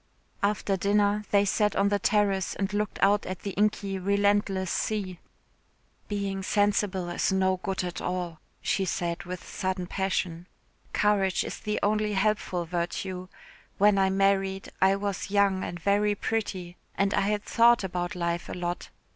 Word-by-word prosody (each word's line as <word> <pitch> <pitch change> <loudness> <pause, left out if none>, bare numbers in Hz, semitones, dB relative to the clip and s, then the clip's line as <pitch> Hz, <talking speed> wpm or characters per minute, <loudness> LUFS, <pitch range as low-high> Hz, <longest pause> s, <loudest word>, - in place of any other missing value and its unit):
After 200 -1 +1
dinner 205 +2 +2
they 200 0 +4
sat 210 +1 +1
on 200 0 +3
the 205 0 +1
terrace 200 -3 +1
and 200 +1 -2
looked 210 +1 -1
out 200 +1 +4
at 185 -1 -5
the 200 - -4
inky 200 -1 0
relentless 200 -1 +1
sea. 195 -5 -2 0.9
"Being 200 -2 -2
sensible 205 -2 +1
is 175 - 0
no 190 0 +2
good 185 +1 -3
at 180 -1 -4
all," 180 -3 -3 0.2
she 195 - +1
said 175 -2 -2
with 180 0 -7
sudden 185 -1 -2
passion. 180 -2 -2 0.4
"Courage 195 -3 +2
is - - -6
the 210 0 -2
only 210 0 +1
helpful 195 -3 0
virtue; 180 +2 -3 0.5
when 205 0 +5
I 190 0 +3
married 195 0 +1
I 190 +1 +5
was 200 -1 -3
young 200 -2 +2
and 175 - -5
very 205 +3 +2
pretty 190 -5 -3 0.2
and 195 0 +1
I - - +2
had 205 +1 0
thought 235 -1 +4
about 175 -1 -3
life 170 -1 -2
a - - -4
lot. 175 0 -4
195 Hz, 155 wpm, -27 LUFS, 185-205 Hz, 0.9 s, when